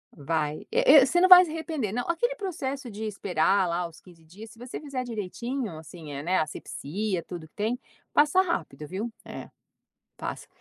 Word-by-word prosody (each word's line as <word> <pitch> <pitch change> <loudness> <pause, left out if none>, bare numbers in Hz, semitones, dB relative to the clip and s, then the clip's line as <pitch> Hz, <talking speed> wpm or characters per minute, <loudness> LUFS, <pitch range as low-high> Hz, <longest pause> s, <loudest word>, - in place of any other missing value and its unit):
vai, 150 0 -2
e 470 - +2 0.2
e 260 - +5
você 350 +5 +2
não 370 - +5
vai 365 0 +11
se 320 - -7
arrepender 315 - -3
não, 245 +3 -1
aquele 480 +9 +1
processo 280 - -4
de 215 +1 -7
esperar 195 -2 +1
lá 170 +1 -1
os 165 - -16
15 170 -3 -18
dias, 205 +7 -12
se - - -16
você 245 +2 -7
fizer 275 -4 -4
direitinho, 230 - -4
assim, 160 -1 -10
né, 185 +3 +2
assepsia 170 +5 -3
tudo 170 -3 -8
que - - -39
tem, 225 +4 -1 0.3
passa 300 +6 +5
rápido 155 - -3
viu? 215 +7 -4
É. - - -8 0.7
Passa. - - -5
215 Hz, 180 wpm, -27 LUFS, 170-275 Hz, 0.7 s, vai